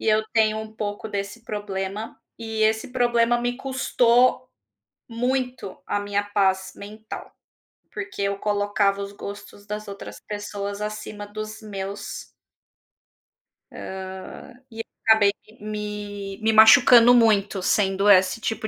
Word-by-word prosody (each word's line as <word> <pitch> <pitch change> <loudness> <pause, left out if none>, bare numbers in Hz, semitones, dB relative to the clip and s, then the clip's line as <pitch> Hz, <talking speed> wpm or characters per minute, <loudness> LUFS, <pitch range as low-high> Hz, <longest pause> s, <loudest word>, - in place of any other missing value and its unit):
e - - -2
eu 215 0 +3
tenho 220 -1 +2
um 220 0 -7
pouco 210 0 -4
desse 205 +3 -5
problema. 205 0 -5 0.2
E 220 -1 -3
esse 220 +2 +1
problema 240 -1 +2
me 245 0 -2
custou 255 -1 +2 0.6
muito 250 -2 -2
a 205 - -1
minha 205 0 -1
paz 195 -2 0
mental, 215 +2 -9 0.6
porque 395 - -6
eu 200 0 -1
colocava 205 -1 0
os 200 0 -5
gostos 205 0 -10
das 210 0 -6
outras 200 0 -9
pessoas 205 0 -5
acima 210 -1 -6
dos 215 +1 -7
meus 200 -1 -6 1.5
hã, - - -8 0.8
e 225 - -13
eu - - -2 0.2
acabei 215 -2 +6 0.3
me 210 -2 -6
me 220 0 +2
machucando 235 +2 +8
muito, 205 -4 +3
sendo 195 +1 +2
esse 185 +3 +5
tipo 220 -1 -2
210 Hz, 125 wpm, -24 LUFS, 200-225 Hz, 1.5 s, machucando